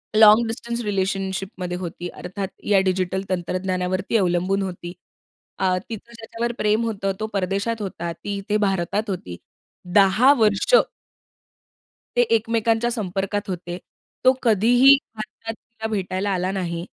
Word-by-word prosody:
Long 215 Hz, +2 st, +7 dB
distance 235 Hz, +1 st, -4 dB
relationship 195 Hz, -2 st, -1 dB
मध्ये 180 Hz, -1 st, -3 dB
होती. 175 Hz, -1 st, -6 dB
अर्थात 190 Hz, +3 st, -5 dB, 0.2 s
या 200 Hz, -2 st, +5 dB
डिजिटल 190 Hz, 0 st, 0 dB
तंत्रज्ञानावरती 185 Hz, +2 st, -1 dB
अवलंबून 185 Hz, 0 st, +1 dB
होती. 180 Hz, -2 st, -5 dB, 0.7 s
आ 185 Hz, -1 st, +2 dB
तिचं 230 Hz, +1 st, -8 dB
ज्याच्यावर 230 Hz, +1 st, -4 dB
प्रेम 215 Hz, +2 st, +2 dB
होतं 200 Hz, -3 st, -1 dB
तो 215 Hz, -, -2 dB
परदेशात 200 Hz, +4 st, -1 dB
होता. 170 Hz, -4 st, -4 dB
ती 200 Hz, +4 st, -5 dB
इथे 205 Hz, +2 st, -1 dB
भारतात 200 Hz, +1 st, 0 dB
होती. 90 Hz, -, -5 dB, 0.6 s
10 205 Hz, +8 st, +6 dB
वर्ष 210 Hz, -, +2 dB, 1.4 s
ते -, -, +6 dB
एकमेकांच्या 225 Hz, +1 st, +1 dB
संपर्कात 200 Hz, -2 st, -2 dB
होते. 175 Hz, -1 st, -4 dB, 0.5 s
तो 255 Hz, -, +8 dB
कधीही 245 Hz, +5 st, +6 dB, 0.2 s
भारतात 220 Hz, +1 st, -7 dB
तिला 225 Hz, -1 st, -8 dB
भेटायला 195 Hz, -1 st, -2 dB
आला 185 Hz, 0 st, -1 dB
नाही. 175 Hz, -3 st, -3 dB
195 Hz, 125 wpm, -23 LUFS, 185-220 Hz, 1.4 s, तो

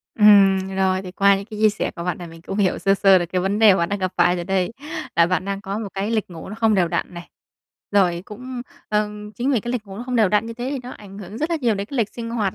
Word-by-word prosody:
Ừm, 200 Hz, -3 st, +6 dB, 0.2 s
rồi, 190 Hz, 0 st, +1 dB
thì 180 Hz, -, -8 dB
qua 200 Hz, +1 st, +4 dB
những 195 Hz, -, -6 dB
cái 215 Hz, -1 st, -9 dB
chia 215 Hz, -, +7 dB
sẻ 210 Hz, -, -2 dB
của 170 Hz, -, -7 dB
bạn 180 Hz, -, -2 dB
là 175 Hz, -, -7 dB
mình 165 Hz, 0 st, -12 dB
cũng 195 Hz, -, -5 dB
hiểu 190 Hz, -3 st, +2 dB
sơ 195 Hz, +2 st, +2 dB
sơ 195 Hz, -1 st, +5 dB
được 175 Hz, -, -2 dB
cái 180 Hz, +2 st, -1 dB
vấn 195 Hz, +3 st, -1 dB
đề 215 Hz, -4 st, +7 dB
bạn 170 Hz, -1 st, 0 dB
đang 205 Hz, -, -2 dB
gặp 185 Hz, -1 st, -2 dB
phải 180 Hz, -, +4 dB
rồi 175 Hz, -, -4 dB
đây, 190 Hz, +2 st, 0 dB, 0.4 s
là 170 Hz, -, +6 dB
bạn 185 Hz, +1 st, -1 dB
đang 200 Hz, 0 st, -3 dB
có 200 Hz, 0 st, -4 dB
một 215 Hz, -3 st, -4 dB
cái 200 Hz, +3 st, -2 dB
lịch 215 Hz, -5 st, -1 dB
ngủ 165 Hz, -2 st, -9 dB
nó 205 Hz, -, -6 dB
không 220 Hz, -1 st, +2 dB
đều 175 Hz, -3 st, +2 dB
đặn 175 Hz, -, -3 dB
này, 175 Hz, 0 st, -9 dB, 0.6 s
rồi 180 Hz, -3 st, +2 dB
cũng, 250 Hz, +3 st, -7 dB, 0.3 s
ờm, 210 Hz, 0 st, -2 dB
chính 245 Hz, +6 st, -1 dB
vì 235 Hz, -, +2 dB
cái 240 Hz, +3 st, -4 dB
lịch 235 Hz, -4 st, -3 dB
ngủ 195 Hz, -, -9 dB
nó 240 Hz, -, -5 dB
không 250 Hz, -1 st, -2 dB
đều 215 Hz, -4 st, +4 dB
đặn 210 Hz, +2 st, +1 dB
như 230 Hz, -, -5 dB
thế 245 Hz, +3 st, -4 dB
thì 280 Hz, -, -2 dB
nó 250 Hz, -, -8 dB
ảnh 200 Hz, -4 st, -11 dB
hưởng 205 Hz, +3 st, -8 dB
rất 310 Hz, +3 st, -2 dB
là 335 Hz, -, +1 dB
nhiều 235 Hz, -4 st, +2 dB
đến 200 Hz, +1 st, -4 dB
cái 280 Hz, -, -5 dB
lịch 225 Hz, -4 st, +1 dB
sinh 230 Hz, -1 st, -5 dB
hoạt 210 Hz, -5 st, -1 dB
200 Hz, 310 wpm, -22 LUFS, 185-220 Hz, 0.6 s, chia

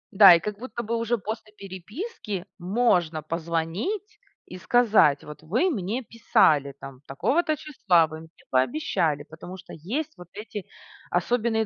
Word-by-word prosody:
Да. 190 Hz, -3 st, +10 dB
И -, -, +2 dB
как 210 Hz, +4 st, -5 dB
будто 240 Hz, -1 st, -5 dB
бы 230 Hz, +1 st, -2 dB
уже 230 Hz, +1 st, 0 dB
после 215 Hz, +1 st, -6 dB
переписки 200 Hz, -, -6 dB
можно 180 Hz, -5 st, +1 dB
позвонить 170 Hz, -, -3 dB, 0.3 s
и 180 Hz, -, -9 dB
сказать: 210 Hz, -, +4 dB
"Вот 150 Hz, 0 st, -10 dB
вы 225 Hz, -, +1 dB
мне 225 Hz, -, -2 dB
писали, 150 Hz, -11 st, +2 dB
там, 135 Hz, -1 st, -10 dB
такого-то 310 Hz, -, +1 dB
числа, 195 Hz, -, +2 dB
вы 155 Hz, 0 st, -8 dB
мне 160 Hz, -, -13 dB, 0.2 s
пообещали". 145 Hz, +3 st, +1 dB
Потому 160 Hz, +4 st, -10 dB
что -, -, -12 dB
есть 265 Hz, -, -4 dB
вот 180 Hz, -, -12 dB
эти 205 Hz, -2 st, -7 dB, 0.4 s
особенные 220 Hz, +4 st, +1 dB
195 Hz, 145 wpm, -25 LUFS, 165-235 Hz, 0.4 s, Да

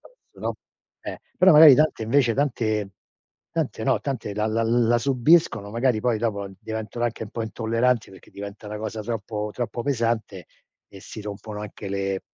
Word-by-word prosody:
penso -, -, -21 dB
no? -, -, -1 dB, 0.5 s
Eh, -, -, -6 dB, 0.2 s
però 185 Hz, -1 st, +6 dB
magari 150 Hz, -2 st, +10 dB
tante 150 Hz, -6 st, +2 dB
invece 120 Hz, +1 st, +3 dB
tante 110 Hz, -7 st, 0 dB, 0.6 s
tante -, -, -2 dB
no, -, -, +2 dB
tante 120 Hz, -7 st, -4 dB
la 105 Hz, +1 st, 0 dB
la 115 Hz, +1 st, 0 dB
la 120 Hz, 0 st, +3 dB
subiscono 130 Hz, -3 st, +3 dB
magari 115 Hz, 0 st, +1 dB
poi 120 Hz, 0 st, +1 dB
dopo 100 Hz, -3 st, -2 dB
diventano 110 Hz, +2 st, -4 dB
anche 115 Hz, -1 st, -2 dB
un -, -, -11 dB
po' 115 Hz, -, -4 dB
intolleranti, 115 Hz, +2 st, 0 dB
perché 95 Hz, -, -16 dB
diventa 100 Hz, +1 st, -9 dB
una 105 Hz, 0 st, -5 dB
cosa 110 Hz, 0 st, -4 dB
troppo 105 Hz, -1 st, -4 dB
troppo 120 Hz, -1 st, -4 dB
pesante 115 Hz, -, -1 dB, 0.4 s
e 100 Hz, -, -13 dB
si 110 Hz, -, -9 dB
rompono 105 Hz, 0 st, -7 dB
anche 105 Hz, -1 st, -7 dB
le 95 Hz, -1 st, -2 dB
110 Hz, 170 wpm, -24 LUFS, 105-120 Hz, 0.6 s, magari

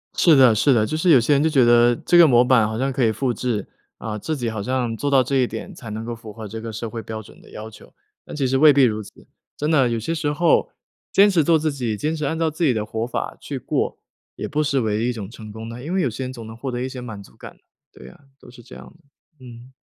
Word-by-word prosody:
是 165 Hz, -3 st, +5 dB
的 130 Hz, -4 st, +6 dB
是 130 Hz, +6 st, +3 dB
的。 110 Hz, -3 st, +2 dB
就 155 Hz, -, -3 dB
是 175 Hz, +3 st, +1 dB
有 145 Hz, -6 st, +7 dB
些 120 Hz, +5 st, +2 dB
人 140 Hz, +1 st, +3 dB
就 160 Hz, -, +2 dB
觉 135 Hz, -5 st, +4 dB
得， 120 Hz, 0 st, +5 dB
这 175 Hz, -, +2 dB
个 170 Hz, -1 st, +8 dB
模 120 Hz, -3 st, +5 dB
板 125 Hz, -4 st, +3 dB
好 110 Hz, +1 st, -4 dB
像 135 Hz, +3 st, -1 dB
可 135 Hz, -1 st, -1 dB
以 110 Hz, -, +2 dB
复 125 Hz, +2 st, -1 dB
制， 120 Hz, -3 st, -3 dB, 0.3 s
啊， 105 Hz, -1 st, -5 dB
自 155 Hz, +9 st, -3 dB
己 120 Hz, -3 st, -2 dB
好 110 Hz, -2 st, -4 dB
像 125 Hz, +1 st, -2 dB
做 145 Hz, +5 st, -2 dB
到 135 Hz, -2 st, +4 dB
这 135 Hz, +2 st, -1 dB
一 125 Hz, -2 st, +2 dB
点， 195 Hz, -, -7 dB
才 125 Hz, -9 st, -10 dB
能 110 Hz, +1 st, -5 dB
够 120 Hz, 0 st, -5 dB
符 115 Hz, -1 st, -11 dB
合 110 Hz, 0 st, -9 dB
这 110 Hz, +2 st, -7 dB
个 115 Hz, 0 st, -6 dB
社 110 Hz, +1 st, -5 dB
会 115 Hz, +1 st, -6 dB
标 110 Hz, 0 st, -7 dB
准 105 Hz, -, -17 dB
的 -, -, -18 dB
要 110 Hz, +1 st, -8 dB
求。 110 Hz, -, -17 dB, 0.3 s
但 -, -, -9 dB
其 140 Hz, -3 st, 0 dB
实 130 Hz, +1 st, +1 dB
未 150 Hz, +2 st, +7 dB
必 140 Hz, -1 st, +4 dB
如 110 Hz, -3 st, +1 dB
此， -, -, -17 dB, 0.3 s
真 150 Hz, -, -2 dB
的， 135 Hz, -6 st, +3 dB
有 115 Hz, -1 st, -1 dB
些 140 Hz, +9 st, -3 dB
时 150 Hz, -2 st, -1 dB
候， 165 Hz, +3 st, +2 dB, 0.4 s
坚 200 Hz, +1 st, +5 dB
持 175 Hz, -5 st, +2 dB
做 165 Hz, +2 st, +4 dB
自 155 Hz, 0 st, -1 dB
己， 120 Hz, -6 st, -3 dB
坚 155 Hz, +7 st, -2 dB
持 155 Hz, -2 st, -3 dB
按 160 Hz, +3 st, -2 dB
照 165 Hz, -1 st, +1 dB
自 155 Hz, +3 st, -4 dB
己 140 Hz, -6 st, +3 dB
的 110 Hz, -2 st, -2 dB
活 110 Hz, +1 st, -3 dB
法 125 Hz, -, -4 dB
去 -, -, -5 dB
过， -, -, -2 dB, 0.4 s
也 -, -, -5 dB
不 150 Hz, +1 st, -1 dB
失 140 Hz, -2 st, 0 dB
为 110 Hz, -1 st, -1 dB
一 125 Hz, -, 0 dB
种 105 Hz, -5 st, -7 dB
成 110 Hz, -2 st, -11 dB
功 110 Hz, +1 st, -8 dB
的， 115 Hz, +2 st, -8 dB
因 165 Hz, +5 st, -4 dB
为 190 Hz, -, +1 dB
有 135 Hz, -, +1 dB
些 120 Hz, +4 st, -5 dB
人 130 Hz, -, -6 dB
总 115 Hz, -3 st, -9 dB
能 110 Hz, -, -9 dB
获 130 Hz, +3 st, -5 dB
得 120 Hz, 0 st, -4 dB
一 130 Hz, -, -2 dB
些 130 Hz, -1 st, -8 dB
满 110 Hz, -5 st, -8 dB
足 -, -, -18 dB
感。 -, -, -12 dB, 0.3 s
对 65 Hz, -, -14 dB
啊， -, -, -15 dB, 0.2 s
都 -, -, -16 dB
是 120 Hz, -1 st, -15 dB
这 60 Hz, -, -13 dB
样 65 Hz, 0 st, -11 dB
的， 140 Hz, -, -21 dB
嗯。 120 Hz, +2 st, -13 dB
125 Hz, 320 characters per minute, -21 LUFS, 110-145 Hz, 0.4 s, 个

